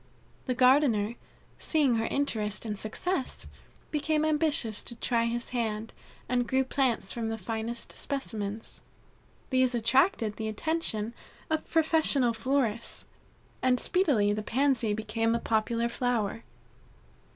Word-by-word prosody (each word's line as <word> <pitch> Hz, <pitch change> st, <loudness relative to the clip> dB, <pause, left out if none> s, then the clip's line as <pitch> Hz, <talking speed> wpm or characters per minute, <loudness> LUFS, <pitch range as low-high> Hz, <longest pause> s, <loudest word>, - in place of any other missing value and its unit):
The 255 Hz, -, 0 dB
gardener, 250 Hz, -4 st, +4 dB, 0.5 s
seeing 285 Hz, -7 st, +2 dB
her 225 Hz, -, 0 dB
interest 220 Hz, -7 st, -1 dB
and 210 Hz, -2 st, -2 dB
success, 260 Hz, -, -3 dB, 0.5 s
became 305 Hz, +1 st, +1 dB
ambitious 300 Hz, -8 st, +1 dB
to 235 Hz, -, -6 dB
try 230 Hz, 0 st, 0 dB
his 235 Hz, +1 st, -2 dB
hand, 225 Hz, -2 st, -2 dB, 0.3 s
and 245 Hz, -1 st, +1 dB
grew 265 Hz, 0 st, +2 dB
plants 260 Hz, -6 st, 0 dB
from 230 Hz, -2 st, -3 dB
the 225 Hz, -, -2 dB
finest 225 Hz, +3 st, -4 dB
specimens. 220 Hz, -6 st, -5 dB, 0.7 s
These 255 Hz, -1 st, +3 dB
attracted 235 Hz, -, +2 dB
the 220 Hz, -, -3 dB
attention 225 Hz, -3 st, -1 dB, 0.4 s
of 315 Hz, 0 st, -1 dB
professional 315 Hz, -6 st, +4 dB
florists, 235 Hz, -1 st, -1 dB, 0.6 s
and 255 Hz, -1 st, +3 dB
speedily 255 Hz, -, +2 dB
the 210 Hz, -, -2 dB
Pansy 245 Hz, -2 st, +1 dB
became 225 Hz, +2 st, 0 dB
a -, -, 0 dB
popular 230 Hz, +1 st, 0 dB
flower. 235 Hz, -3 st, -1 dB
235 Hz, 120 wpm, -29 LUFS, 220-275 Hz, 0.7 s, gardener